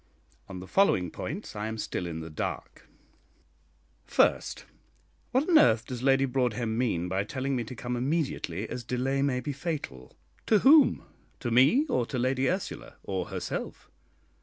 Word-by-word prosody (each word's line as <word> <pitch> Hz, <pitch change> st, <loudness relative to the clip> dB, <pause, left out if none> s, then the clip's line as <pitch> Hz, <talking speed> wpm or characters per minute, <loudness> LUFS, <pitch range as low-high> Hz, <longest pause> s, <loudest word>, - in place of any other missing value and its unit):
On 95 Hz, -1 st, -7 dB
the 90 Hz, -, -8 dB
following 95 Hz, -, +2 dB
points 180 Hz, -, -6 dB
I 105 Hz, +1 st, -3 dB
am 110 Hz, 0 st, -4 dB
still 90 Hz, -4 st, -3 dB
in 80 Hz, -1 st, -5 dB
the 80 Hz, 0 st, -8 dB
dark: 75 Hz, -, -5 dB, 1.1 s
First, -, -, +1 dB, 0.6 s
What 260 Hz, +4 st, +1 dB
on 335 Hz, -4 st, +7 dB
earth 110 Hz, 0 st, +4 dB
does 125 Hz, -2 st, -6 dB
Lady 135 Hz, +1 st, +3 dB
Broadhem 125 Hz, -3 st, -1 dB
mean 110 Hz, -8 st, 0 dB
by 95 Hz, +2 st, 0 dB
telling 130 Hz, +5 st, -3 dB
me 120 Hz, -, -1 dB
to 125 Hz, -, -8 dB
come 120 Hz, +1 st, -4 dB
immediately, 130 Hz, -, -2 dB
as 125 Hz, -, -6 dB
delay 130 Hz, +3 st, -1 dB
may 130 Hz, -3 st, +1 dB
be 145 Hz, +3 st, -4 dB
fatal? 140 Hz, -, -6 dB, 0.3 s
to 220 Hz, -, +5 dB
whom? 290 Hz, +7 st, +6 dB, 0.4 s
to 120 Hz, -, -3 dB
me 135 Hz, -, +5 dB
or 120 Hz, -, 0 dB
to 130 Hz, -, -4 dB
Lady 130 Hz, +2 st, +1 dB
Ursula, 185 Hz, +1 st, -4 dB
or 95 Hz, -2 st, -3 dB
herself? -, -, -5 dB
125 Hz, 160 wpm, -28 LUFS, 110-140 Hz, 1.1 s, on